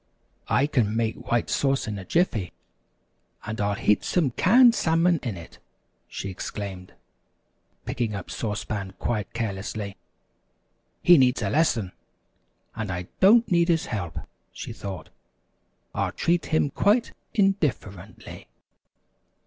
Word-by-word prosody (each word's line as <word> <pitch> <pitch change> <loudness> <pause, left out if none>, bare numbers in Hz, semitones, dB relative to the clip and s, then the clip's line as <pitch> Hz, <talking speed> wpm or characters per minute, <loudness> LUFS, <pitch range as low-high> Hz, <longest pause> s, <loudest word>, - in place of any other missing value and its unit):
] - - -40
"I 140 - +3
can 120 -8 0
make 115 -1 -2
White 120 -1 +2
Sauce 135 -1 +1
in 105 -2 -4
a - - -7
jiffy, 115 - 0 0.9
and 110 0 -4
I'll 100 0 0
heat 105 +1 +2
some 160 -8 +1
canned 235 - +6
salmon 165 -3 +2
in 115 -8 -4
it," 85 - -12 0.5
she - - -6
exclaimed, 95 -1 -7 0.9
picking 115 -4 -2
up 100 - -7
Sauce 105 -2 -3
Pan 100 -3 -5
quite 105 -1 -2
carelessly. 105 -2 -4 1.1
"He 175 -3 +7
needs 125 0 +3
a - - -1
lesson, 125 - +1 0.8
and 110 -2 -4
I 90 0 -5
don't 225 +4 +5
need 170 -1 +4
his 165 -2 +2
help," 90 -8 -4 0.3
she - - -7
thought. 95 -5 -7 0.8
"I'll - - -1
treat 170 0 0
him 155 -3 +1
quite 220 - +2 0.2
in 195 -2 +5
dif 150 -6 +2
fer 95 - -12
ent 100 +4 -14
ly." - - -10
115 Hz, 140 wpm, -25 LUFS, 100-165 Hz, 1.1 s, He